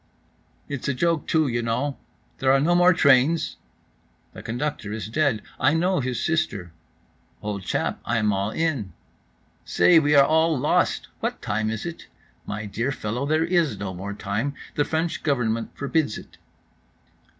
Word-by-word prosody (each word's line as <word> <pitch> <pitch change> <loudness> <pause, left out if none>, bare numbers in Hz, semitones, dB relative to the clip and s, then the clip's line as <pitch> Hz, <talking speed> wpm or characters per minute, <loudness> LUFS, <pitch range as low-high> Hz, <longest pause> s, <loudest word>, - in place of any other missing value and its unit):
"It's 145 -3 -4
a 140 - 0
joke, 165 +2 0
too, 160 -2 +2
you 120 -2 -1
know, 125 +5 -1 0.4
there 130 0 +3
are 135 - +5
no 160 +5 +2
more 175 +1 +6
trains?"—"The 145 -1 0
conductor 120 -3 -3
is 105 -2 -4
dead. 135 -4 +1 0.2
I 150 - +3
know 180 +2 +2
his 125 -2 -2
sister."—"Old 100 - -5
chap, - - -2
I 120 - 0
am 105 -2 +2
all 100 +1 -1
in."—"Say, 155 - 0
we 150 -1 +2
are 140 -1 +7
all 160 0 +3
lost."—"What 145 +4 0
time 110 +1 -1
is 110 -1 -4
it?"—"My 110 -9 -8
dear 115 +6 -2
fellow, 125 +3 -3
there 155 +2 +2
is 170 -4 +1
no 100 -2 -4
more 100 +3 -6
time, 110 +9 -2 0.2
the 145 - +1
French 160 +1 -1
Government 115 -6 -1
forbids 145 -4 0
it." - - -13
135 Hz, 145 wpm, -24 LUFS, 110-160 Hz, 0.4 s, are